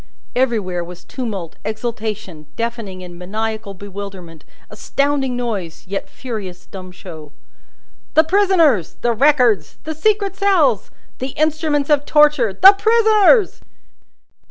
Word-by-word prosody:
Everywhere 215 -9 0
was 175 +1 -11
tumult, 210 - -6
exultation, 215 -8 -5
deafening 230 -5 -5
and 175 -1 -11
maniacal 215 +2 -4
bewilderment, 190 -4 -9 0.2
astounding 275 +3 -1
noise, 205 -9 -4
yet 195 +1 -5
furious 205 -8 -7
dumb 185 -2 -10
show. 160 -5 -11 0.8
"The 315 - +7
Prisoners!" 330 - +2
"The 240 -1 +2
Records!" 245 - +2
"The 315 - -4
secret 400 +3 0
cells!" 325 - +2 0.3
"The 260 +1 -5
instruments 310 -1 0
of 290 -1 +2
torture!" 295 -7 +4
"The 380 - +8
Prisoners!" 435 0 +3
235 Hz, 110 wpm, -19 LUFS, 190-300 Hz, 0.8 s, The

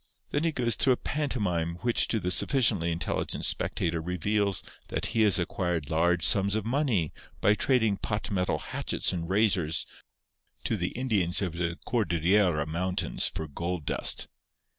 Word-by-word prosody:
Then 145 - 0
he 165 - +2
goes 120 -5 0
through 130 +5 +3
a - - -3
pantomime 100 - -2
which 120 0 +2
to 110 - 0
the 90 -2 -2
sufficiently 105 - +3
intelligent 85 - -2
spectator 85 -1 -1
reveals 100 +3 -1 0.2
that - - -2
he 115 - +2
has 105 -3 +5
acquired 85 -4 -2
large 85 +1 +2
sums 100 +1 +5
of 110 -1 -2
money 120 - 0 0.3
by 105 - +4
trading 110 -3 +1
pot 105 +2 -3
metal 90 -2 0
hatchets - - -1
and 85 -1 -4
razors 95 -6 +2 0.8
to - - 0
the - - -2
Indians 105 -8 +2
of 90 -4 -3
the 85 0 -3
Cordillera 90 -6 +1
Mountains 90 +4 -1
for 80 - -4
gold 85 +2 -4
dust. - - +1
95 Hz, 155 wpm, -28 LUFS, 85-110 Hz, 0.8 s, has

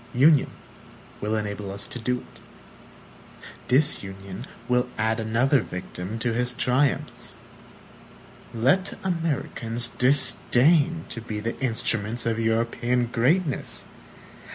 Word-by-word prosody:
Union 145 +3 +5 0.7
will 105 +1 0
enable 105 -2 -3
us 100 +1 -4
to 125 - -7
do 125 +1 -1
it. - - -17 1.3
Disunion 100 -9 0 0.2
will 125 0 +3
will - - -16
add 110 +1 +1
another 115 +5 +2
victim 90 +3 -6
to 115 +1 -1
his 125 +1 0
triumphs. 130 +3 0 1.2
Let 135 - +1
Americans 140 -9 -1
disdain 145 +4 +3
to 115 - -6
be 110 -2 -5
the 115 +2 -3
instruments 115 -2 -1
of 115 -1 0
European 115 +2 +1
greatness! 145 +6 +1
120 Hz, 105 wpm, -25 LUFS, 110-135 Hz, 1.3 s, Union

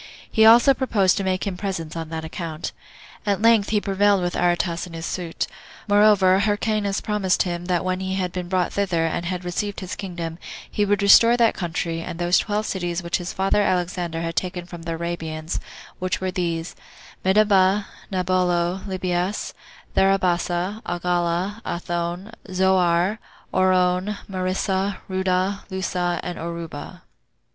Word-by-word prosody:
He 220 0 +6
also 240 +4 +7
proposed 215 -8 +2
to 200 - -1
make 185 +1 -1
him 195 -2 -2
presents 180 -5 -4
on 165 -1 -5
that 160 0 -4
account. 165 -1 -5 0.5
At 200 -2 0
length 225 -2 +4
he 215 - +2
prevailed 200 -1 +2
with 175 - -1
Aretas 175 0 0
in 170 - -12
his 165 0 -5
suit. 170 -3 -3 0.4
Moreover, 205 -2 +5
Hyrcanus 205 -1 0
promised 205 -3 +1
him, 175 -1 -4
that 180 0 0
when 185 0 0
he 190 0 -2
had 185 -2 -1
been 180 -1 -4
brought 185 -1 0
thither, 180 -5 +1
and 170 +1 -2
had 180 0 -3
received 200 +3 -2
his 185 -2 -5
kingdom, 170 -4 -5 0.3
he 210 - +1
would 205 0 +1
restore 230 +4 +7
that 230 -2 +4
country, 165 -2 -3
and 165 - -6
those 175 +1 +3
twelve 210 0 -1
cities 175 -2 -2
which 170 - 0
his 175 0 -5
father 195 +2 +1
Alexander 175 -3 -1
had 165 0 -3
taken 180 -1 -2
from 175 -1 -9
the 165 0 -4
Arabians, 165 -1 -4 0.4
which 185 0 -1
were 185 0 -2
these, 170 -2 -2 0.5
Medaba, 195 0 +4 0.3
Naballo, 180 -1 +1
Libias, 185 +1 -2 0.4
Tharabasa, 185 +1 +1
Agala, 175 +3 -1
Athone, 175 +3 -3 0.2
Zoar, 185 +1 +2 0.3
Orone, 185 +2 +2
Marissa, 190 +1 -1
Rudda, 190 +1 0
Lussa, 180 -2 -1
and 175 - -5
Oruba. 170 -3 -6
185 Hz, 150 wpm, -23 LUFS, 175-195 Hz, 0.5 s, also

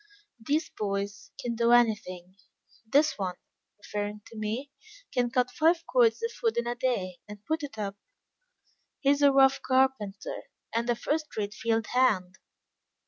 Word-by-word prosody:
These 300 +7 0
boys 200 -1 -3
can 245 -3 -2
do 235 +1 +3
anything. 190 -6 +1 0.5
This 285 +1 +3
one," 185 -2 -2 0.4
referring 205 0 -4
to - - -12
me, 225 +6 -3 0.4
"can 245 -1 +1
cut 250 +1 +1
five 330 +2 +2
cords 470 -2 +3
of 460 - -1
wood 455 -2 +1
in 235 - +1
a 240 - -1
day, 230 -8 -2
and 210 0 -10
put 315 +1 -1
it 275 -6 -7
up. 200 -1 -4 1.0
He 275 - +4
is 285 0 +1
a 285 -1 +7
rough 270 0 +5
carpenter, 260 -6 0 0.3
and 235 +1 0
a 240 - +3
first 305 +5 -2
rate 205 -1 -2
field 225 0 0
hand. 200 -8 +2
235 Hz, 155 wpm, -28 LUFS, 205-275 Hz, 1.0 s, a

